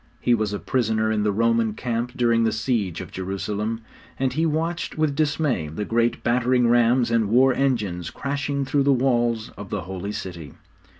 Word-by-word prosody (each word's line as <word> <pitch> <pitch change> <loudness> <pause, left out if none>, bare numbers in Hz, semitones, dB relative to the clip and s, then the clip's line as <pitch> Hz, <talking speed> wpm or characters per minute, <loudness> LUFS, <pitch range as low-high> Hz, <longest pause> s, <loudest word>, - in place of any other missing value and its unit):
He 120 - +2
was 110 -3 0
a 100 - -2
prisoner 110 -2 0
in 110 -1 +1
the 105 0 +1
Roman 115 0 +1
camp 120 +1 -3
during 115 -2 +3
the 110 - +2
siege 110 -6 -1
of - - -9
Jerusalem, 105 +4 -3 0.4
and 130 -1 0
he 160 +4 +1
watched 165 +2 -2
with 155 -2 +1
dismay 145 - 0
the 80 +8 -4
great 115 +2 0
battering 125 +1 +2
rams 120 0 +3
and 115 -3 +2
war 130 +3 +5
engines 105 - -1
crashing 140 0 -2
through 140 +2 +1
the 140 +1 +3
walls 120 -3 +1
of 100 -2 -8
the 105 - -2
Holy 95 +3 -5
City. 90 -8 -7
115 Hz, 180 wpm, -23 LUFS, 105-130 Hz, 0.4 s, war